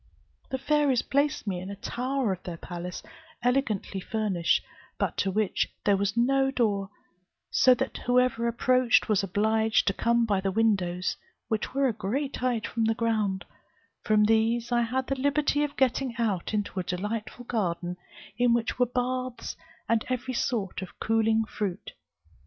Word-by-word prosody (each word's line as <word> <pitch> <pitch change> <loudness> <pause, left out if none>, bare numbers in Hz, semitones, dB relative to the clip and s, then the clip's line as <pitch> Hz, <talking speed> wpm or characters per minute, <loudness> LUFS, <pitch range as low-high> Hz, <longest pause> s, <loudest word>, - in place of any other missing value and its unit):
The 265 - -1
fairies 285 -2 +2
placed 290 0 0
me 190 -4 -2
in 185 +2 -7
a 200 - -5
tower 250 +2 -1
of 185 - -8
their 175 -2 -6
palace, 175 +1 -6 0.4
elegantly 245 -6 0
furnished, 190 -4 0 0.3
but - - -1
to 195 - +1
which 205 +1 0
there 205 - +5
was 200 +3 -1
no 270 +3 +3
door, 205 -7 0 0.6
so 255 -1 +6
that 265 +1 -3
whoever 245 -1 +2
approached 250 +1 +3
was 210 -3 +3
obliged 220 +3 +2
to 195 - +2
come 235 +2 +2
by 200 -4 +1
the 195 0 0
windows, 185 -4 +1 0.3
which 220 +3 -2
were 275 0 +3
a 240 - 0
great 245 +7 -2
height 245 -3 0
from 225 -1 -1
the 225 0 +2
ground: 215 -4 0 0.6
from 215 -1 +3
these 225 +2 +2
I 240 0 +3
had 250 +3 -1
the 270 0 -2
liberty 290 +1 +2
of 290 -1 -4
getting 260 -1 +1
out 210 -7 -1
into 205 -2 -2
a - - -1
delightful 210 +7 -4
garden, 180 -6 -2 0.4
in 240 -1 +4
which 235 +1 -2
were 250 - +4
baths, 255 0 -2 0.3
and 230 -1 +2
every 255 0 -2
sort 220 -7 -1
of 185 - -9
cooling 225 0 +2
fruit. 200 -3 -4
225 Hz, 165 wpm, -27 LUFS, 200-250 Hz, 0.6 s, so